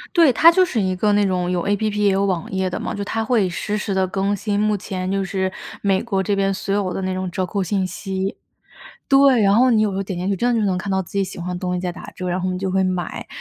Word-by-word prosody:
对， 330 -6 +6
它 320 +8 +7
就 370 +2 +4
是 270 -11 -1
一 185 -2 0
个 210 +3 +2
那 205 0 +3
种 180 -2 -1
有 180 -1 0
APP， 210 +1 0
也 205 -1 +4
有 195 +1 +1
网 185 -4 -2
页 190 -1 -1
的 180 - -4
嘛， - - -4
就 200 - -3
它 225 +2 -2
会 225 -5 +2
实 205 +4 -3
时 210 -1 -2
地 190 0 +2
更 195 +2 -1
新， 205 0 -2
目 210 0 +2
前 185 -1 -4
就 195 0 0
是， 190 -1 -2 0.3
美 195 -1 +2
国 195 -5 -1
这 200 +2 0
边 195 0 +1
所 195 0 -2
有 200 -3 0
的 190 - -4
那 185 0 -2
种 185 -1 -3
折 185 +2 -2
扣 195 +2 -2
信 190 +1 0
息。 190 +2 -4 0.7
对， 275 -3 +5
然 200 0 +4
后 250 +4 +5
你 220 -2 +4
有 215 - +1
时 190 - -4
候 195 - -1
点 190 -2 -5
进 180 +2 -2
去 200 - 0
真 240 +5 +1
的 230 - +1
就 210 - +1
能 185 -2 +1
看 200 +1 -4
到 190 0 +1
自 175 - -15
己 200 -1 +1
喜 190 - -9
欢 175 +1 -5
的 - - -5
东 180 -1 -2
西 180 - -2
在 180 -1 -2
打 - - -10
折， 185 - -5
然 180 +1 -1
后 185 0 -1
你 180 - -3
就 190 0 -2
会 190 +1 +2
买， 185 -2 -3
195 Hz, 335 characters per minute, -21 LUFS, 185-210 Hz, 0.7 s, 它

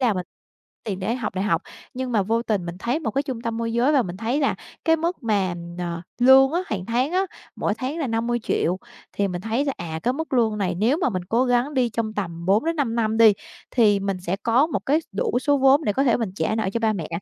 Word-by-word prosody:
Là 245 -4 +3
mình 180 -1 -3 0.6
tiền 195 -4 -3
để 215 +5 -1
học 215 -6 -4
đại 190 - -1
học, 170 -3 +1 0.3
nhưng 255 -1 -3
mà 210 - +3
vô 230 +4 0
tình 205 -7 -1
mình 175 +1 -6
thấy 245 +10 -1
một 255 - -2
cái 275 +6 0
trung 260 -5 -5
tâm 230 -1 -2
môi 230 0 -2
giới 245 +6 +3
và 270 -4 +4
mình 180 -3 -6
thấy 235 +8 -1
là 275 - +2 0.3
cái 325 0 +4
mức 335 0 -2
mà, 200 -6 +1 0.2
ờ, 170 -1 -4 0.2
lương 265 +3 +7
á, 345 - +1
hàng 190 -3 -4
tháng 250 +7 0
á, 380 +1 +2 0.3
mỗi 210 - 0
tháng 270 +7 -3
là 290 - -1
50 235 +1 0
triệu 180 +2 0 0.4
thì 200 -1 0
mình 175 -1 -4
thấy 230 +6 0
là, 275 - 0
à, 160 -2 -5
cái 250 - +1
mức 320 +2 -5
lương 225 -4 +2
này 185 -3 0
nếu 225 - +2
mà 330 - +1
mình 185 -5 -3
cố 235 +7 +1
gắng 245 +3 +1
đi 250 -2 +2
trong 220 -1 -3
tầm 170 -4 -4
4 205 +8 +3
đến 330 0 0
5 260 -6 0
năm 220 -1 0
đi 225 -2 +7 0.4
thì 210 -5 +4
mình 195 -2 -2
sẽ 180 +2 -2
có 240 +6 +3
một 320 - -2
cái 295 +4 +3
đủ 205 +4 0
số 285 +1 +2
vốn 270 +3 +5
để 205 - +1
có 270 - +1
thể 245 - +4
mình 225 -5 -2
trả 215 - 0
nợ 220 -3 0
cho 230 - -1
ba 220 -1 +2
mẹ. 170 -7 -4
230 Hz, 270 wpm, -23 LUFS, 200-265 Hz, 0.6 s, lương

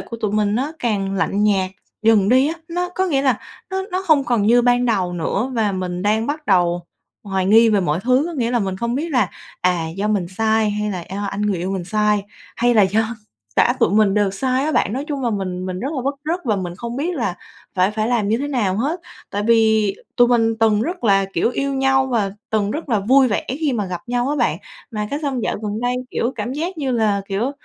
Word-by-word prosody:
của 230 - -7
tụi 210 -2 -2
mình 210 -1 +1
nó 270 +7 -1
càng 195 -4 -1
lạnh 195 +1 0
nhạt 190 -3 +2 0.3
dần 215 -3 +4
đi 260 +3 +5
á. 325 - -2
Nó 355 +1 -2
có 375 +1 -1
nghĩa 280 -6 +1
là 260 -5 +2 0.3
nó 380 0 -1
nó 370 +1 -2
hông 300 -5 +4
còn 240 -4 +1
như 240 +2 +5
ban 245 0 +3
đầu 190 -6 0
nữa 195 +8 -1
và 215 -3 +1
mình 180 -1 -3
đang 215 +3 +1
bắt 300 +1 -4
đầu 175 -3 +2 0.4
hoài 190 -2 -1
nghi 225 +3 +6
về 210 -3 +3
mọi 160 -1 0
thứ, 255 +3 +3
có 345 - -5
nghĩa 240 -7 -1
là 245 - +2
mình 190 -3 -2
không 235 +3 -2
biết 310 +5 -2
là, 245 - +2 0.3
à, 175 -3 +1
do 205 +2 -1
mình 200 -5 0
sai 220 +2 +1
hay 210 0 -2
là 180 -4 -4
do 205 +1 -3
anh 205 - -3
người 205 -2 +1
yêu 180 +3 -3
mình 190 -2 -3
sai, 210 +1 +1 0.3
hay 240 +1 +2
là 215 - +6
do 220 +4 +1 0.4
cả 245 - +4
tụi 230 - +4
mình 205 -1 +3
đều 205 -2 +2
sai 255 +6 0
á 310 - 0
bạn. 205 - +1
Nói 270 +3 -3
chung 285 -3 -3
là 240 - +1
mình 185 -3 -3
mình 185 0 -4
rất 265 - -2
là 255 - -2
bứt 275 +1 0
rứt 335 +4 -1
và 215 -5 +1
mình 175 -2 -4
không 235 +3 -5
biết 330 +6 -1
là 220 - -1 0.4
phải 185 +1 +3
phải 215 +1 -1
làm 230 -4 +1
như 225 +3 +2
thế 285 - -3
nào 215 -9 0
hết, 295 - -1 0.3
tại 205 - -2
vì 220 -3 +3 0.2
tụi 245 0 +5
mình 225 -2 +3
từng 215 -1 +3
rất 350 +2 -4
là, 195 -2 +4
kiểu, 230 - +1
yêu 275 +2 -2
nhau 265 0 +2
và 225 -6 0 0.2
từng 210 -2 +1
rất 305 +2 -4
là 220 -4 +2
vui 260 +6 +4
vẻ 205 - -1
khi 290 +2 -1
mà 210 -5 -1
gặp 180 -1 -4
nhau 245 +1 0
á 295 - 0
bạn, - - +1 0.3
mà 210 -2 -3
cái 285 - -1
xong 270 -5 -2
dạo - - -1
gần 210 +1 -3
đây, 245 +1 0 0.2
kiểu, 240 - -1
cảm 230 +3 -3
giác 335 +5 -3
như 275 -3 -1
là, 215 -4 +1
kiểu, 210 +7 -1
220 Hz, 250 wpm, -20 LUFS, 200-260 Hz, 0.4 s, nghi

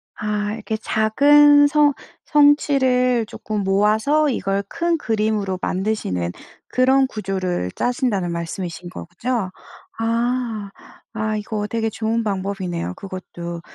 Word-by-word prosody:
아 210 -1 -2
이렇게 220 0 -4
작은 290 +8 +5
성 295 -1 +4 0.3
성취를 260 -5 +3
쪼끔 210 -1 -4
모아서 215 +10 +2
이걸 200 -5 -1
큰 340 0 0
그림으로 215 - -1
만드시는 185 - -1 0.4
그런 265 +1 +3
구조를 185 - -3
짜신다는 225 -8 0
말씀이신 170 +1 -5
거죠? 185 +4 -4 0.5
아. 230 -2 -1 0.4
아 215 -1 -1
이거 210 0 -3
되게 225 0 -1
좋은 225 +1 -1
방법이네요 190 - -3
그것도. 175 -3 -7
215 Hz, 250 characters per minute, -21 LUFS, 195-250 Hz, 0.5 s, 작은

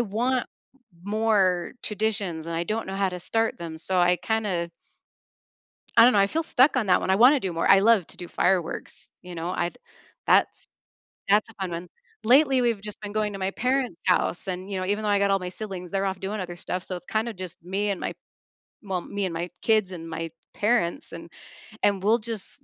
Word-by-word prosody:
want 240 +4 0 0.6
more 200 -4 +1
traditions 200 -6 -1
and 170 - -4
I 170 - -1
don't 220 +3 -2
know 190 - -5
how 195 -1 +1
to 180 -1 -6
start 225 +4 0
them, 165 -2 -6
so 185 +3 0
I 180 0 +4
kinda 195 -7 -1 1.3
I 230 - +9
don't 250 - +7
know, 205 - +3
I 195 - +5
feel 325 +11 -1
stuck 275 -2 +4
on 240 -5 +1
that 180 -1 +4
one, - - -2
I 190 - +4
wanna 260 +6 +6
do 190 -5 -3
more, 165 0 0
I 195 - +7
love 210 -4 +4
to - - -7
do 175 -1 -8
fireworks, 180 -2 -1
you 180 -1 -9
know, 165 +1 -3
I’d 175 0 -2 0.5
that's - - +2 0.6
that's 210 +3 +4
a - - -16
fun 190 -2 -2
one. 170 +1 -5 0.4
Lately, 265 +2 +5
we've 235 -4 +1
just 210 -1 -7
been 205 -1 -6
going 215 -1 0
to 195 - -6
my 190 0 -1
parents' 250 -6 -1
house 180 0 +1
and, 185 +1 -4
you 195 - -2
know, 185 - -2
even 205 +3 -1
though - - 0
I 205 - +3
got 200 0 +2
all 195 - +3
my 180 -1 -5
siblings, 185 -3 -6
they're 195 0 0
off 190 -1 -2
doing 200 +2 -3
other 175 -1 -6
stuff 180 +1 -3
so, 185 - -3
it's 175 - -7
kind 220 +5 -1
of 225 - -7
just 180 -3 -7
me 195 +3 -1
and 195 - -3
my, - - -3 0.7
well, 190 -4 -3
me 200 +2 -3
and 180 - -3
my 170 +2 -3
kids 215 -4 +2
and 165 -2 -7
my 165 0 -4 0.2
parents, 220 - 0
and - - -9 0.5
and 200 -2 +2
we'll 220 +4 +4
just 225 +3 -4
195 Hz, 225 wpm, -25 LUFS, 180-220 Hz, 1.3 s, I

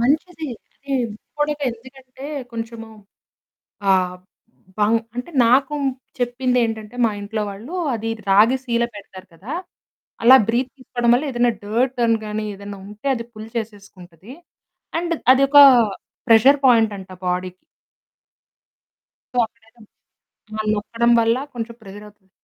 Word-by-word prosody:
మంచిది. 310 +5 0 0.4
అది 275 -1 -2 0.2
ముక్కు 215 - -17
పుడక 295 0 -1
ఎందుకంటే 260 +2 -13 0.3
కొంచెము 225 -1 -6 1.0
ఆహ్, 185 -1 +2 0.6
బాము 215 +2 +3 0.2
అంటే 250 +7 -5 0.2
నాకు 270 +4 +3 0.4
చెప్పిందేంటంటే 245 -3 -1
మా 225 - +3
ఇంట్లో 210 +1 -3
వాళ్ళు 225 - -9 0.2
అది 225 0 -3 0.2
రాగి 215 +7 +5
సీల 235 -2 0
పెడతారు 190 -2 -11
కదా! 200 - -9 0.7
అలా 255 +3 +9
బ్రీత్ 245 +3 0
తీసుకోవడం 240 -2 -1
వల్ల 260 +5 0
ఏదైనా 240 -1 +2
డర్ట్ 245 +5 0
అని 230 0 +2
గాని 215 +1 -3
ఏదైనా 200 0 -9
ఉంటే 210 +6 -11
అది 235 -2 -5
పుల్ 215 0 -10
చేసేసుకుంటది. 200 -3 -8 0.7
అండ్ 340 0 -1 0.2
అదొక 275 +2 +2 0.7
ప్రెషర్ 245 +6 +6
పాయింటంట 220 -6 +2 0.2
బాడీకి. 180 0 -3 1.7
సో, 245 - +3
పెట్టటం 225 0 -22 0.8
ఆ! - - +2
నొక్కడం 230 +3 0
వల్ల 230 0 +3 0.2
కొంచెం 235 -1 -6
ప్రెషర్ 205 0 -11
అవుతది. 205 -2 -22
230 Hz, 120 wpm, -21 LUFS, 210-255 Hz, 1.7 s, అలా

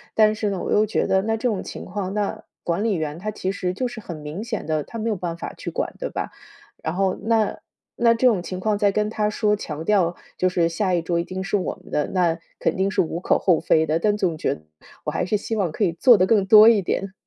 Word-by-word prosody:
但 215 -1 +5
是 210 -1 -1
呢， 195 - -2
我 - - -4
又 210 - +4
觉 215 - 0
得 190 - +3
那 225 +2 -1
这 235 - -1
种 210 -5 -1
情 - - -8
况 190 0 -4
那 205 -1 -2 0.2
管 170 +4 0
理 225 - +1
员 155 -1 -3
他 215 +3 -3
其 190 -2 -3
实 180 -2 -2
就 250 +7 -2
是 240 -2 -8
很 170 -5 -7
明 150 +7 -6
显 230 -3 -4
的， 155 -1 -1
他 230 - -8
没 230 - -1
有 215 - 0
办 170 -2 -4
法 - - -6
去 - - -6
管 - - -3
对 - - -4
吧？ - - -4 0.5
然 160 - -2
后 190 0 +1
那 225 -1 +1 0.4
那 235 -1 +4
这 230 +2 +3
种 200 -8 +2
情 185 0 -5
况 210 +2 0
再 205 -1 +3
跟 210 +1 0
他 210 -1 0
说， 210 -1 +1
强 160 -5 -6
调 185 -4 +3 0.2
就 185 - +2
是 170 -2 +2
下 185 +2 -1
一 175 - +2
桌 170 +1 -1
一 - - -3
定 185 +2 -5
是 195 +2 -1
我 190 - -2
们 - - -16
的， 150 - 0
那 175 -3 +1 0.2
肯 - - 0
定 190 +1 0
是 - - -2
无 170 0 0
可 - - +2
厚 175 -5 +3
非 160 -1 +3
的。 155 +1 +1
但 210 +4 +1
总 175 -6 0
觉 - - 0
得， 75 - -16 0.4
我 - - -1
还 - - -1
是 210 +3 +1
希 225 +2 -4
望 190 -6 0
可 205 +7 0
以 170 - 0
做 240 +5 +6
得 185 - +3
更 205 -3 +3
多 215 +2 +9
一 220 -4 +6
点。 190 +2 -2
195 Hz, 295 characters per minute, -23 LUFS, 175-215 Hz, 0.5 s, 多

